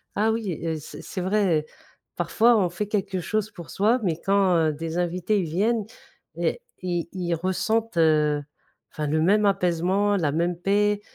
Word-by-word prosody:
Ah 215 +2 +2
oui, 210 -7 -3
heu, 165 -1 -1
c'est 150 - -10
c'est 185 - -5
vrai, 185 -5 +1 0.5
parfois 230 +1 +3
on 180 -4 +2
fait 180 +4 -3
quelque 195 -3 -2
chose 215 +3 -1
pour 175 -6 -11
soi 225 +6 +2
mais 165 -3 -1
quand, 195 -2 +3
heu, 160 -2 +2
des 165 +2 -5
invités 180 +4 0
ils 180 - -1
viennent 210 +7 0 0.5
et - - -1 0.2
ils 175 -2 -2
ils 175 -2 -2
ressentent, 205 +5 -1
heu, 150 -2 +3 0.5
enfin 150 -1 -3
le 155 +2 +1
même 205 +5 +3
apaisement, 195 +2 +2
la 150 -5 0
même 170 +2 0
paix, 205 +2 +1
185 Hz, 170 wpm, -25 LUFS, 165-205 Hz, 0.5 s, parfois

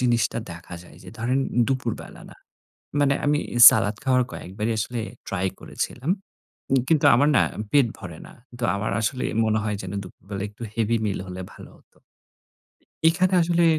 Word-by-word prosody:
জিনিসটা 120 -2 +1
দেখা 85 +1 -9
যায় 90 - -16
যে - - -11
ধরেন, 125 +4 0 0.3
দুপুরবেলা 130 -4 -4
না - - -15 0.6
মানে 140 -1 +3
আমি 145 0 +3 0.3
সালাদ 105 -1 0
খাওয়ার 130 -1 +3
কয়েকবারই 105 +5 -4
আসলে 120 +2 -2 0.3
ট্রাই 95 -1 -1
করেছিলাম। 135 +8 -4 0.6
উম 135 - +4
কিন্তু 160 -3 +3
আমার 145 +4 +4
না - - +6 0.3
পেট 140 -5 +5
ভরে 85 -6 -9
না। - - -14 0.2
কিন্তু 120 0 -4
আমার 100 +1 -2
আসলে 125 +4 -1 0.2
মনে 110 0 +1
হয় 105 -1 -1
যে - - -8 0.2
দুপুরবেলা 95 +1 -8
একটু 105 +3 -11
হেভি 115 +1 +1
মিল 100 - -1
হলে 90 0 -6
ভালো - - -12
হত। - - -29 1.1
এইখানে 185 +3 +2
আসলে 170 0 +2
115 Hz, 160 wpm, -24 LUFS, 100-135 Hz, 1.1 s, না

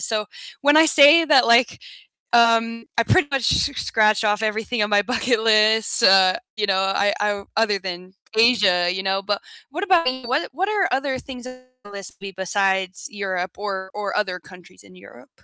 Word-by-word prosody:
so, 215 -2 -2 0.4
when 290 +2 +3
I 320 0 +6
say 300 +3 +6
that, 290 -5 +3
like, 235 +1 +2 0.5
um, 230 -1 +2
I - - +4
pretty 300 +1 +1
much 270 -4 0
s - - +1
scratched 215 0 +1
off 210 +1 0
everything 220 +1 -2
on 205 - -2
my 205 0 +3
bucket 245 -1 -1
list, 220 -1 +2
uh, 190 -1 +4 0.2
you 210 -1 -2
know, 190 -1 0
I 205 +1 0
I 205 -1 -2
other 215 -3 +1
than 185 0 -9 0.2
Asia, 200 -7 +3
you 190 +1 -4
know. 195 0 -2
But 205 0 -3 0.3
what 360 +7 -4
about 345 -8 +2
you? 260 -2 -10
What 265 +5 -2
what 375 +8 -3
are 415 -3 0
other 265 -1 -2
things 255 -2 -10
on 255 0 -11 0.2
your 205 - -14
list 195 -2 -10 0.2
besides 190 -1 -2
Europe 190 -3 -5
or 190 -2 -6
or 205 -2 -5
other 190 -4 -2
countries 175 - -17
in 95 -2 -20
Europe? - - -17
215 Hz, 185 wpm, -20 LUFS, 195-250 Hz, 0.5 s, I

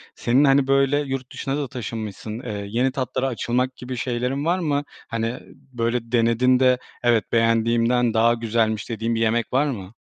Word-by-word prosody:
Senin, 130 +5 +2
hani, 135 -1 +4
böyle, 135 +1 +3
yurt 135 -3 -4
dışına 135 +1 -3
da 145 -2 -2
taşınmışsın, 110 -3 -6
eee, 105 -5 -5
yeni 125 +5 +1
tatlara 130 0 -2
açılmak 125 +1 -1
gibi 125 0 -6
şeylerin 125 +3 -2
var 175 +3 +1
mı? 145 -4 0 0.2
Hani, 115 +1 -3 0.3
böyle, 115 0 -2
denedin 120 +2 +3
de, 130 -1 +4 0.3
"Evet, 120 -2 +2
beğendiğimden 115 +1 +2
daha 115 +1 +4
güzelmiş." 115 -2 -1
dediğin 115 0 -2
bir - - -1
yemek 115 +2 0
var 135 +3 +3
mı? 100 -7 -5
120 Hz, 165 wpm, -23 LUFS, 115-130 Hz, 0.3 s, hani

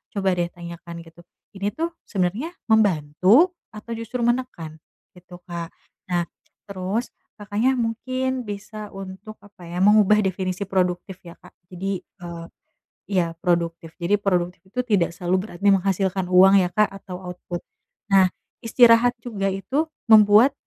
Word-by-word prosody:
coba 195 -1 +1
deh 175 - +1
tanyakan 170 -1 -10
gitu 165 +1 -18 0.3
ini 200 0 -4
tuh 335 +1 -2 0.2
sebenarnya 205 - -2 0.2
membantu 200 - +4 0.2
atau 215 +2 -9
justru 230 +2 -4
menekan 235 -11 -2 0.3
gitu 180 0 -15
Kak, 170 -2 -6 0.4
nah 175 -1 0 0.4
terus 200 +4 -3 0.2
Kakaknya, 215 +5 0
mungkin 255 +2 -2
bisa 210 +1 -7
untuk 195 +3 -9
apa 195 -4 -14
ya 175 +2 -1
mengubah 210 0 +5
definisi 185 0 -2
produktif 185 -1 -2
ya 170 -1 -13
Kak, - - -18 0.2
jadi 190 +1 -4 0.2
eee, 170 -1 -7 0.6
iya 180 -4 0
produktif, 170 -2 -1
jadi 195 +3 0
produktif 180 -2 0
itu 250 +6 -3
tidak 190 -8 +1
selalu 180 +1 0
berarti 175 0 -10
menghasilkan 190 -1 0
uang 190 +2 +7
ya 180 - +1
Kak, 210 +4 +3
atau 190 -2 -8 0.2
output, 175 0 -7 0.5
nah 190 -1 +6 0.3
istirahat 235 0 +5
juga 200 -5 -2
itu 260 - -1 0.2
membuat, 215 +3 +7
195 Hz, 135 wpm, -23 LUFS, 180-220 Hz, 0.6 s, uang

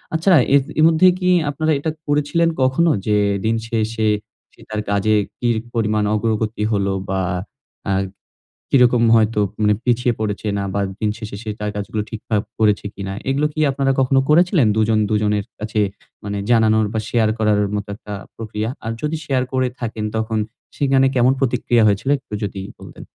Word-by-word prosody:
আচ্ছা, 175 +4 +3 0.2
এর 140 - +6 0.2
এ - - +5
মধ্যে 165 +3 +5
কি 180 -1 +1 0.2
আপনারা 155 +3 0
এটা 160 +3 -2 0.2
করেছিলেন 150 +3 +2
কখনো, 130 +6 +3 0.2
যে 105 -1 +3 0.3
দিন 115 +1 +2
শেষে 110 -1 0 0.5
সে - - -21
তার 110 0 -2
কাজে 105 +2 +2 0.2
কি 120 - -1 0.3
পরিমাণ 110 -2 +1
অগ্রগতি 110 0 -1
হল, 100 -2 +1 0.2
বা 95 0 0 0.7
অ্যা 100 - 0 0.8
কিরকম 125 -3 +4
হয়তো 110 -1 +2 0.2
মানে 105 0 +4
পিছিয়ে 120 0 +2
পড়েছে 105 0 -3
না 100 - -2
বা 100 - 0 0.2
দিন 105 - +1
শেষে 110 -3 -7
সে 110 - -6
তার 105 0 -2
কাজগুলো 105 +1 -3
ঠিকঠাক 110 -1 -2 0.2
করেছে 105 -2 +2
কিনা। 95 -1 -5 0.2
এগুলো 140 +3 +1
কি 155 - -5
আপনারা 135 0 +1
কখনো 135 +1 +3
করেছিলেন? 170 - +4
দুজন-দুজনের 105 -1 +1
কাছে 110 0 -2 0.4
মানে 100 0 -4
জানানোর 110 -2 +4
বা 110 - 0
শেয়ার 110 -2 +2
করার 105 -1 +2 0.2
মতো 105 0 -4
একটা 105 0 -9 0.2
প্রক্রিয়া? 110 0 -4 0.2
আর 115 - -2
যদি 150 +1 -1
শেয়ার 130 -4 +1
করে 130 -1 +1
থাকেন, 110 -2 -4
তখন 110 0 -1 0.4
সেখানে 135 -2 +3
কেমন 125 +1 +4
প্রতিক্রিয়া 120 -3 +2
হয়েছিল 105 +6 0
একটু 130 - -15
যদি 100 -1 -4 0.2
বলতেন। - - -11
110 Hz, 165 wpm, -20 LUFS, 105-135 Hz, 0.8 s, এর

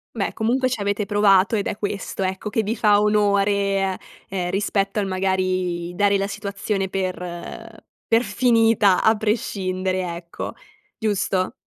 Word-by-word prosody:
Beh, 200 -4 -2
comunque 255 +4 +1
ci 245 -4 -3
avete 200 +1 -1
provato 205 0 +4
ed 205 - -1
è - - -3
questo, 200 -2 -3
ecco, 190 +3 -3
che 220 - 0
vi 215 +3 -2
fa 210 -2 +4
onore 205 -1 +3
eh, 195 -1 0 0.3
ehm 180 -2 -2
rispetto 195 +1 -1
al 200 - 0
magari 185 -2 -1
dare 200 +1 +3
la 195 - -1
situazione 200 -1 -3
per 185 -1 -2 0.9
per 230 +2 +3
finita 225 -4 +3
a 220 - +5
prescindere, 185 -4 -1
ecco. 170 0 -7 0.4
Giusto? 195 -4 0
200 Hz, 145 wpm, -22 LUFS, 190-210 Hz, 0.9 s, a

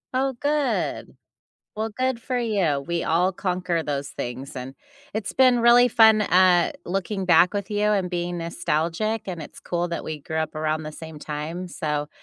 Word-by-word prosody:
Oh, 265 +1 +1
good. 290 -1 -1 0.6
Well, 220 +1 -2
good 255 +1 -1
for 255 +1 -3
you, 190 - 0
we 170 -1 -1
all 180 +3 +2
conquer 180 -2 -1
those 145 -2 -3
things, 125 +3 -6
and 130 +2 -6 0.4
it's 215 -1 -3
been 255 -2 +5
really 240 +1 +6
fun, 220 -2 +6
uh, 180 -2 +4
looking 195 +2 -2
back 175 +1 +5
with 200 -2 -3
you 210 -1 -1
and 195 -3 +1
being 175 0 -3
nostalgic, 170 +6 -1
and 175 -4 -5
it's - - -11
cool 175 0 -2
that 170 - -4
we 155 -2 -5
grew 160 +3 -5
up 160 0 -2
around 155 0 -1
the 155 - -6
same 160 -1 -9
time, 155 +5 -5
so, 150 -4 -3
175 Hz, 175 wpm, -24 LUFS, 155-215 Hz, 0.6 s, really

